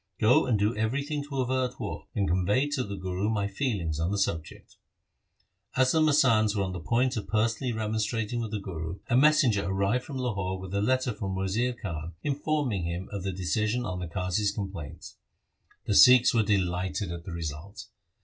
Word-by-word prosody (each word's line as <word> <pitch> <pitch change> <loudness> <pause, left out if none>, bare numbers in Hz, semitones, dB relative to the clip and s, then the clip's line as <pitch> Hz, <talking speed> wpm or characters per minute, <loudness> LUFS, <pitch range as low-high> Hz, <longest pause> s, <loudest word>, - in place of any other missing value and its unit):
Go 110 +4 +4
and 120 -4 +2
do 105 +3 +1
everything 140 +7 -1
to 140 -2 -2
avert 130 0 -1
war, - - -5
and 100 -3 +1
convey 100 - +2
to 145 -3 -1
the 100 -2 -5
Guru 95 +2 -2
my 105 -3 0
feelings 100 - -2
on 80 +2 0
the 100 - -1
subject.' 80 -5 -3 1.0
As 130 0 +4
the 160 - +3
masands 125 -9 +4
were 100 - +1
on 95 - -3
the 90 - -5
point 120 +9 +1
of 105 - -4
personally 115 +3 0
remonstrat 110 0 -2
ing 120 - -1
with 115 - -3
the 105 0 -3
Guru, 85 -2 -5
a - - +4
messenger 130 -7 +4
arrived 100 +6 0
from 140 -4 -7
Lahore 100 -7 -2
with 95 0 -8
a 100 - +1
letter 130 +2 +1
from 95 -4 -4
Wazir 100 +7 0
Khan 85 -8 -6
informing 140 - -1
him 85 +2 -4
of 100 -2 -4
the 95 - -3
Emperor's 95 0 -5
decision 110 +6 0
on 90 -3 -3
the 90 - -4
Qazi's 90 +4 -1
complaints. 95 -7 -7 0.7
The - - 0
Sikhs 125 +3 +7
were 115 - +4
delighted 95 -2 -1
at 85 -1 -6
the 95 - -6
result. 85 +4 -6
105 Hz, 195 wpm, -28 LUFS, 95-125 Hz, 1.0 s, Sikhs